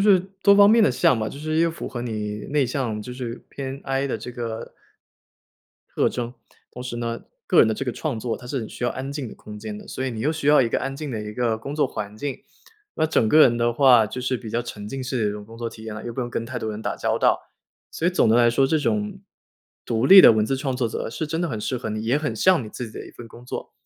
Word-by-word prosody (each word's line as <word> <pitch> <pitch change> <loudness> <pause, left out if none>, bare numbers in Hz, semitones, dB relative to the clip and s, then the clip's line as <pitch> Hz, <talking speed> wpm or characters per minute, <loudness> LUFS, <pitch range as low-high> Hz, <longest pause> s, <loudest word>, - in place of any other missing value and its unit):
是 185 -3 +6 0.2
多 200 - +7
方 200 0 +7
面 225 +1 +6
的 - - +4
像 125 0 +3
吧， 110 - -1
就 - - -9
是 155 +1 -2
一 165 - +4
个 170 - +2
符 165 - -6
合 120 -2 -5
你 105 -3 -4
内 145 -2 +2
向， 120 -4 -2
就 115 - -8
是 125 -2 -6
偏 135 0 -6
I 135 +1 -1
的 - - -2
这 - - -7
个 115 -2 -6 1.2
特 - - +4
征。 120 +1 -4 0.4
同 125 - -8
时 125 -1 -5
呢， 115 0 -3 0.2
个 - - +3
人 - - +8
的 110 - +1
这 110 - -3
个 125 - -1
创 120 -2 -3
作， 115 -1 -2
它 125 - -12
是 135 +2 -2
很 110 - -6
需 - - -6
要 120 - +1
安 135 +1 -5
静 140 -3 -4
的 - - -9
空 105 0 -10
间 105 0 -6
的。 - - -13
所 130 - -4
以 130 - -1
你 110 -2 -5
又 150 - +1
需 155 -3 -4
要 150 -1 +6
一 120 - +2
个 - - 0
安 135 - -4
静 150 0 -5
的 110 -3 -3
一 105 0 -6
个 115 -1 0
工 140 +6 -6
作 150 - +2
环 105 -1 -6
境。 140 +2 -4 0.6
那 160 - +1
整 135 -7 +2
个 155 - +5
人 120 -5 +6
的 120 0 +1
话， 125 -3 +6
就 120 +4 -6
是 130 0 0
比 115 -2 -8
较 120 - 0
沉 105 -3 -8
浸 135 +5 -5
式 125 -3 -1
的 - - +2
一 - - -4
种 105 0 -8
工 115 +2 -13
作 115 0 -3
体 110 -1 -12
验 110 -1 -6
了， 110 - -8
又 120 - -5
不 130 - -4
用 120 - -2
跟 115 - -3
太 125 +1 -5
多 110 -2 -3
人 105 - -6
打 - - -2
交 - - 0
道。 - - +1 0.4
所 165 - -2
以 180 - +4
总 180 - +3
的 110 - +5
来 120 -1 +5
说， 135 +3 +3
这 160 - +2
种， 105 -7 -1 0.7
独 115 +2 +1
立 195 +5 +11
的 - - +9
文 110 -1 +2
字 135 +5 -1
创 130 -2 -2
作 125 - 0
者， 110 - -4
是 155 +7 -4
真 160 +2 -2
的 175 - 0
很 110 - -3
适 130 - -2
合 115 - -5
你， 110 0 -3
也 125 +6 +2
很 150 -6 -2
像 185 - +4
你 110 - -8
自 115 +1 -7
己 - - -9
的 - - -8
一 - - -12
份 120 - -11
工 120 +2 -14
作。 125 - -6
120 Hz, 320 characters per minute, -23 LUFS, 110-140 Hz, 1.2 s, 立